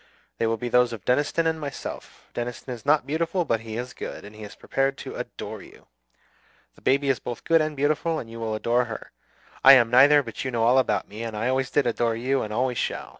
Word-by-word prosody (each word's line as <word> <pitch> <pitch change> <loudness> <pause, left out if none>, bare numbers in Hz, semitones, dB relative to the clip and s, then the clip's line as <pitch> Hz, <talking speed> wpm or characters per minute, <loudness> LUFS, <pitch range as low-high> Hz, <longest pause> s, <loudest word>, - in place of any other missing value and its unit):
They 115 - +1
will 115 0 0
be 120 - -4
those 125 0 +3
of 110 - -9
Deniston 145 +6 +1
and 160 -1 0
myself. 140 -2 -7
Deniston 120 +1 -5
is 120 +3 -11
not 150 +1 +4
beautiful, 165 +4 -1
but 115 -6 +1
he 110 0 -7
is 125 +1 -5
good, - - -7
and 105 +1 -12
he 110 - -12
is 105 -1 -9
prepared 135 0 -1
to - - -7
adore - - -7
you. - - -16 0.9
The - - -22
baby 140 +1 +2
is 135 - +1
both 120 -1 -6
good 165 -1 +4
and 155 -1 -2
beautiful, 155 +3 +1
and 120 - -6
you 115 0 -9
will 110 -1 -2
adore 120 +3 +1
her. 115 -1 -8 0.5
I 135 - +10
am 120 -3 +5
neither; 140 +3 +7
but 115 -3 -6
you 130 - -2
know 115 -2 0
all 125 +3 +5
about 105 -6 0
me, 105 +3 -9
and 115 -2 -5
I 115 +4 0
always 130 0 0
did 140 +1 +1
adore 115 -1 0
you 130 +3 0
and 105 - -5
always 125 +2 0
shall. - - -3
125 Hz, 240 wpm, -25 LUFS, 115-140 Hz, 0.9 s, I